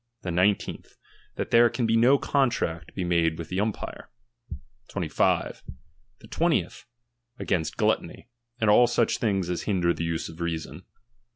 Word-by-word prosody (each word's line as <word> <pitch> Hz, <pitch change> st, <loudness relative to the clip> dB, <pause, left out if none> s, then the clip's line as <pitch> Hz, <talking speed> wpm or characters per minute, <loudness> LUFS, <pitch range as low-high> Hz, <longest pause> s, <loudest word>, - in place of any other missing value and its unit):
The 90 Hz, -, -3 dB
nine 95 Hz, +4 st, +4 dB
teenth, -, -, -10 dB, 0.4 s
that -, -, -4 dB
there 120 Hz, 0 st, +6 dB
can 120 Hz, -, -2 dB
no 115 Hz, +5 st, +4 dB
contract 115 Hz, -, -1 dB
be 95 Hz, -, -2 dB
made 85 Hz, -2 st, +1 dB
with 85 Hz, -, -7 dB
the 95 Hz, -, -2 dB
umpire^ 105 Hz, 0 st, -3 dB, 0.8 s
^^^25. -, -, 0 dB, 0.6 s
The -, -, -14 dB
twentieth, -, -, -1 dB, 0.5 s
against 80 Hz, -3 st, -2 dB
gluttony, -, -, -1 dB, 0.3 s
and 110 Hz, -2 st, +3 dB
all 120 Hz, +3 st, +6 dB
auch 120 Hz, -, +1 dB
things 95 Hz, -6 st, 0 dB
as 90 Hz, -, -3 dB
^HUuder 90 Hz, -4 st, +1 dB
tbe -, -, -13 dB
use 85 Hz, 0 st, -2 dB
of 80 Hz, +1 st, -11 dB
reason. 85 Hz, -2 st, -4 dB
95 Hz, 150 wpm, -26 LUFS, 85-115 Hz, 0.8 s, there